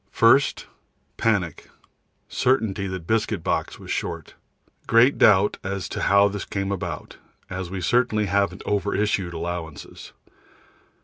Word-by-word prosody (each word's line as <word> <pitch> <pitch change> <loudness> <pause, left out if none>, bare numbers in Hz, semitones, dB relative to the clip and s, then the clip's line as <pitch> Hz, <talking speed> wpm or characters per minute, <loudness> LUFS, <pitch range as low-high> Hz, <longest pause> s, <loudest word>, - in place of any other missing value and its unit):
First 130 +5 +3 0.5
panic, 95 -9 -1 0.6
certainty 110 -7 0
that 95 -3 -6
biscuit 110 +3 0
box - - -1
was - - -9
short. - - -4 0.5
Great 115 +4 +4
doubt 105 0 +5
as 95 -3 -3
to - - -4
how 100 +1 +5
this 100 0 -4
has - - -6
come 100 0 -2
about, 100 - -5 0.3
as 95 -1 -4
we 95 0 -5
certainly 120 -1 +2
haven't 100 +1 0
over 100 0 0
issued 100 -4 0
allowances. 85 -2 -6
100 Hz, 130 wpm, -24 LUFS, 95-110 Hz, 0.6 s, doubt